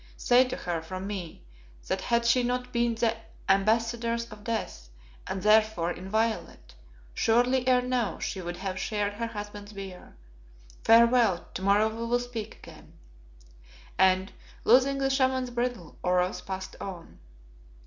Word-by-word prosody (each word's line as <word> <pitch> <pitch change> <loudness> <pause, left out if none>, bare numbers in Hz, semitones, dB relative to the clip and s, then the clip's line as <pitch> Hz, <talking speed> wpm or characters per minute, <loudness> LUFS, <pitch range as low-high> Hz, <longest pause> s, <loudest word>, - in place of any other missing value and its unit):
Say 250 +1 +4
to 255 - -4
her, 170 -2 -3
from 185 +3 -6
me, 190 -5 -6 0.4
that - - -1
had 235 0 +1
she 235 +2 +4
not 250 +1 -2
been 235 -1 +1
the 225 0 +1 0.3
ambassadress 230 +4 +1
of 210 -1 -11
death, 220 - -4 0.4
and, 190 - -4
therefore, 215 -5 +3
inviolate, 220 +5 -3 0.4
surely 245 - +2
ere 250 -1 +4
now 250 -3 -1
she 190 - -4
would 175 0 -5
have 190 0 -4
shared 205 -1 -1
her 230 +3 -3
husband's 205 -1 -8
bier. 190 - -10 0.7
Farewell, 230 -5 +5
tomorrow 200 +3 +3
we 225 +1 -6
will 240 +1 +2
speak 235 -3 -6
again," - - -15 1.0
and, 190 +1 +3 0.3
loosing 265 +4 +4
the 270 0 +1
Shaman's 260 -2 +1
bridle, 240 -8 -3
Oros 180 0 +1
passed 190 -1 -6
on. 180 -4 -8
220 Hz, 140 wpm, -28 LUFS, 190-240 Hz, 1.0 s, Farewell